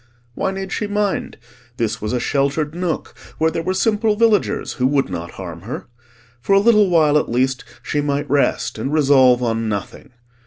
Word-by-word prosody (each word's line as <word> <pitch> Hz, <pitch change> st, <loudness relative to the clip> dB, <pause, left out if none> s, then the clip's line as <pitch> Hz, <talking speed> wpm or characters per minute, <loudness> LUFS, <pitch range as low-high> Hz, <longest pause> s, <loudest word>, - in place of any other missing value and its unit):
Why 190 Hz, -, -1 dB
need 195 Hz, 0 st, -5 dB
she 210 Hz, -, -2 dB
mind? 205 Hz, -1 st, -2 dB, 0.4 s
This 110 Hz, -1 st, -2 dB
was 105 Hz, 0 st, -3 dB
a 125 Hz, -, 0 dB
sheltered 140 Hz, +4 st, 0 dB
nook 175 Hz, -2 st, -3 dB, 0.2 s
where 160 Hz, +1 st, +2 dB
there 165 Hz, -, -2 dB
were 185 Hz, +3 st, -2 dB
simple 215 Hz, +1 st, +1 dB
villagers 225 Hz, -1 st, +1 dB
who 130 Hz, -, +4 dB
would 135 Hz, -4 st, +1 dB
not 85 Hz, -1 st, -5 dB
harm 85 Hz, -3 st, -8 dB
her. 115 Hz, +8 st, -6 dB, 0.6 s
For 195 Hz, -, +1 dB
a 195 Hz, -, +6 dB
little 210 Hz, -2 st, +4 dB
while, 155 Hz, -3 st, +4 dB
at -, -, -4 dB
least, 130 Hz, +2 st, 0 dB, 0.2 s
she 145 Hz, -, -1 dB
might 145 Hz, 0 st, -1 dB
rest 140 Hz, +1 st, 0 dB
and 135 Hz, -, -3 dB
resolve 135 Hz, -5 st, +4 dB
on 115 Hz, -1 st, -1 dB
nothing. 100 Hz, -3 st, -5 dB
145 Hz, 185 wpm, -20 LUFS, 125-190 Hz, 0.6 s, a